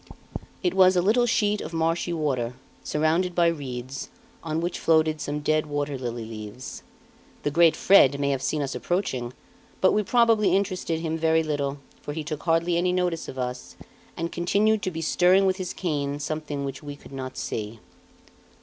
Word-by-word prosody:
It 180 -1 +1
was 185 -1 +6
a 180 - +4
little 240 +5 +3
sheet 210 -2 +1
of - - -7
marshy 165 +2 0
water, 130 -7 -1 0.3
surrounded 165 +4 +1
by 175 - +4
reeds, 135 -5 -3 0.3
on 160 -1 -2
which 175 +1 -2
floated 155 -1 +2
some 145 +1 -3
dead 155 +1 +1
water 145 -1 -2
lily 120 -3 -4
leaves. 110 +3 -8 0.6
The 145 - 0
great 165 +1 +5
Fred 140 -8 +5
may 140 0 +1
have 135 -2 -1
seen 140 +2 -1
us 135 - -3
approaching, 130 -10 -2 0.5
but 190 - +4
we 210 - +2
probably 225 -1 +3
interested 185 -4 -1
him 160 -1 -2
very 160 0 +3
little, 145 -2 -2 0.2
for 145 - -5
he 155 0 -4
took 150 0 -5
hardly 170 +1 +1
any 180 +1 +2
notice 180 -2 -1
of 130 - -8
us 125 0 -5 0.4
and 170 0 -3
continued 205 +5 +2
to 185 - -1
be 165 -2 -5
stirring 180 +4 +4
with 190 -1 +2
his 185 -2 -4
cane 145 -5 -2
something 150 -1 -3
which 135 -1 -6
we 145 -1 -7
could 145 - -15
not 130 -1 -6
see. 110 +1 -4
160 Hz, 180 wpm, -25 LUFS, 140-180 Hz, 0.6 s, was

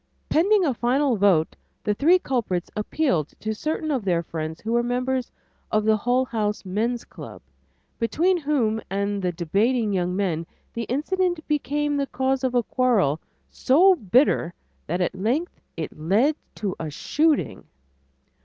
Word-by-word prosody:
Pending 385 +4 +3
a 280 - +1
final 250 +3 +1
vote, 190 -6 +3 0.3
the 210 - +1
three 320 - +4
culprits 230 - -2
appealed 210 - 0
to 220 0 -2
certain 310 +6 -2
of 260 -6 -1
their 175 -3 +1
friends 160 -1 -5
who 220 - -4
were 235 0 +3
members 250 +1 -1 0.4
of 215 0 +1
the 220 0 +4
Hull 245 +4 +1
House 215 -4 -2
Men's 225 +6 -1
Club, - - -10 0.6
between 320 - +2
whom 250 -8 0
and 200 +1 -1
the 180 -1 0
debating 205 +7 0
young 180 -1 0
men 170 -5 -1 0.3
the 230 0 -3
incident 350 +4 -1
became 295 0 0
the 280 -1 -1
cause 265 +1 -1
of 255 -1 0
a 240 - +3
quarrel 215 - +1 0.3
so 355 +9 +5
bitter 225 - +2 0.3
that 175 +4 -1
at 180 - 0
length 240 - -2 0.2
it 160 - -5
led 205 - +2 0.2
to 195 -3 -3
a 160 - -4
shooting. 280 - 0
235 Hz, 155 wpm, -24 LUFS, 190-280 Hz, 0.6 s, so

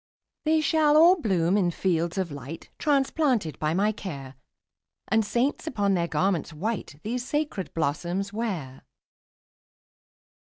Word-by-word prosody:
``They 315 0 +3
shall 305 -1 +4
all 345 +2 +6
bloom 185 - +2
in 190 -4 +3
fields 170 0 -1
of 185 -4 -1
light, 140 +3 -8
Transplanted 270 - +1
by 155 +1 0
my 205 +3 +2
care, 140 -11 -7 0.7
And 220 +2 +3
saints, 240 +9 -1
upon 205 -8 +1
their 170 -2 +1
garments 170 +1 0
white, 180 -2 -4
These 240 +3 -2
sacred 295 -8 -2
blossoms 175 +6 -1
wear.'' 180 - -4
195 Hz, 125 wpm, -26 LUFS, 165-250 Hz, 0.7 s, all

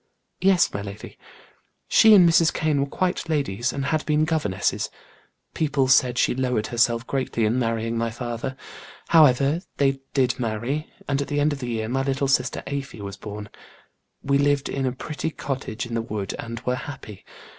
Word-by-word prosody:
"Yes, 190 -2 +3
my 100 - -3
lady. 100 +1 -9 0.7
She 220 -1 +7
and 180 -3 +7
Mrs. 165 -1 +4
Kane 155 -3 0
were 140 - 0
quite 180 +1 -1
ladies; 130 -7 0
had 145 +3 -1
been 150 0 +3
governesses. 125 - -1 0.6
People 140 -4 +1
said 125 -2 +4
she - - +3
lowered 125 -4 0
herself 120 0 +1
greatly 130 -5 -1
in 115 +4 +1
marrying 115 -1 -1
my 115 0 0
father. 120 +3 -5 0.5
However, 145 0 +5 0.2
they 135 -1 +2 0.2
did 130 -2 +2
marry, 120 +6 -2 0.2
and 140 0 0
at 140 - -3
the 145 0 -1
end 145 +1 +2
of 140 - -6
the 125 -2 -4
year 110 -2 -2
my 130 +3 0
little 135 +1 0
sister 135 - +1
Afy 140 -4 -5
was 100 -1 -6
born. 105 0 -8 0.7
We 140 0 +2
lived 145 0 +2
in 135 -1 -1
a - - 0
pretty 150 +5 -4
cottage 130 -6 -4
in 120 - -7
the 115 - 0
wood 105 -3 -4
and 115 0 -5
were 125 - -1
happy. 130 -8 -9
130 Hz, 175 wpm, -24 LUFS, 115-145 Hz, 0.7 s, She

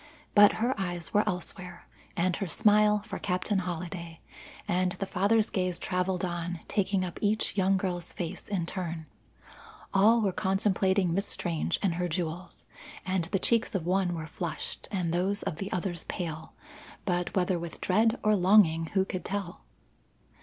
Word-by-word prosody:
But 205 -1 +8
her 240 +4 +1
eyes 175 -3 -3
were 210 - +4
elsewhere, 180 0 -5 0.3
and 180 0 +2
her 195 - -2
smile 210 +3 +4
for 210 -3 -5
Captain 190 +2 0
Holliday, 170 -2 -5 0.5
and 180 0 +1
the 195 - -3
father's 205 +4 +2
gaze 185 -2 0
travelled 180 0 -1
on, 175 -1 -3
taking 195 -2 +1
up 175 - -7
each 215 0 +1
young 195 0 +3
girl's 180 -2 -2
face 175 +1 -5
in 190 -5 -1
turn. 170 -3 -4 0.9
All 215 +4 +6
were 195 - +2
contemplating 190 -1 +1
Miss 200 +3 0
Strange 170 0 -1
and 190 -4 +2
her 180 - +1
jewels, 170 +1 -4 0.4
and 185 -2 0
the 185 - 0
cheeks 225 +2 +1
of 175 -4 -1
one 180 -1 +1
were 160 -1 -4
flushed 160 +1 -5
and 180 -5 -1
those 195 +4 0
of 185 -6 -3
the 195 +3 -5
others 175 -2 -2
pale, 160 -2 -5 0.5
but 175 -2 -1
whether 180 -1 +1
with 170 0 -7
dread 220 +5 +2
or 215 -1 +4
longing 180 -4 +5
who 190 -1 +4
could 185 -2 -4
tell. 200 -2 -4
185 Hz, 160 wpm, -29 LUFS, 175-200 Hz, 0.9 s, But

